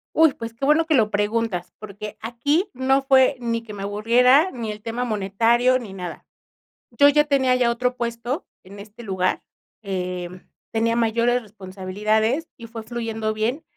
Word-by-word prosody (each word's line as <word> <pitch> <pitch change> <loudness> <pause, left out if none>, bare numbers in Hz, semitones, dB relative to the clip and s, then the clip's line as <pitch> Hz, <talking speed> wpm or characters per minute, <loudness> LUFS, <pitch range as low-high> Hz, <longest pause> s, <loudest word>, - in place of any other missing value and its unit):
Uy, 320 -3 +5
pues 230 0 -7
qué 240 +4 -4
bueno 305 +3 +4
que 320 - +1
lo 220 -5 +3
preguntas, 205 -3 -1
porque 210 0 -8
aquí 285 - 0
no 265 +2 +2
fue 270 0 +4
ni 230 -1 -2
que 220 -2 -10
me 200 -1 -6
aburriera 245 - +4
ni 235 -3 -5
el 210 0 -9
tema 235 +2 -3
monetario 230 +4 +2
ni 210 -6 -9
nada. 180 -3 -7 0.7
Yo 285 +5 +5
ya 295 +1 +4
tenía 270 -4 +2
ya 245 -2 +2
otro 250 +1 -1
puesto 235 - -3 0.2
en 195 +2 -13
este 205 +3 -12
lugar, 190 -4 -1 0.4
em, 180 -2 -5 0.2
tenía 230 +1 +1
mayores 235 +1 +1
responsabilidades 210 - -2
y 230 -1 -11
fue 225 -1 -8
fluyendo 225 -1 -3
bien 230 +8 -2
230 Hz, 165 wpm, -22 LUFS, 210-250 Hz, 0.7 s, Uy